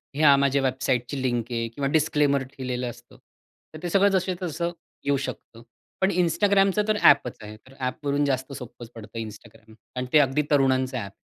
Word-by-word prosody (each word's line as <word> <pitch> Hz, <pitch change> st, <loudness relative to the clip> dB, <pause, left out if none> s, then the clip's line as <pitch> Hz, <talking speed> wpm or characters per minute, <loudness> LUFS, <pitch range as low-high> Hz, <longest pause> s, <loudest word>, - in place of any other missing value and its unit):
ह्या 145 Hz, -1 st, +6 dB
माझ्या 140 Hz, 0 st, +2 dB
वेबसाईटची 130 Hz, 0 st, -1 dB
लिंक 120 Hz, -3 st, 0 dB
आहे 115 Hz, -1 st, -1 dB
किंवा 135 Hz, +4 st, -3 dB
डिस्क्लेमर 145 Hz, -3 st, +2 dB
केलेलं 125 Hz, -1 st, -3 dB
असतं. 120 Hz, -, -14 dB, 0.6 s
तर 155 Hz, -, -8 dB
ते 175 Hz, -, -2 dB
सगळं 195 Hz, +3 st, +4 dB
जसंच्या 185 Hz, -1 st, -1 dB
तसं 170 Hz, +2 st, -2 dB, 0.3 s
येऊ 140 Hz, 0 st, +2 dB
शकतं. 125 Hz, -3 st, -7 dB, 0.4 s
पण 190 Hz, +1 st, +3 dB
Instagramच 195 Hz, +3 st, +2 dB
तर 215 Hz, -, +2 dB
ॲपच 125 Hz, -, +5 dB
आहे 105 Hz, 0 st, -9 dB
तर 130 Hz, -, -16 dB
ॲपवरून 140 Hz, +2 st, -1 dB
जास्त 130 Hz, 0 st, -1 dB
सोप्पंच 120 Hz, -2 st, -9 dB
पडतं 115 Hz, 0 st, -8 dB
Instagram 110 Hz, 0 st, -10 dB, 0.2 s
आणि 125 Hz, 0 st, -3 dB
ते 155 Hz, -, +8 dB
अगदी 140 Hz, +1 st, +2 dB
तरुणांचं 130 Hz, -2 st, +2 dB
ॲप. 100 Hz, -5 st, -5 dB
135 Hz, 170 wpm, -25 LUFS, 125-155 Hz, 0.6 s, ते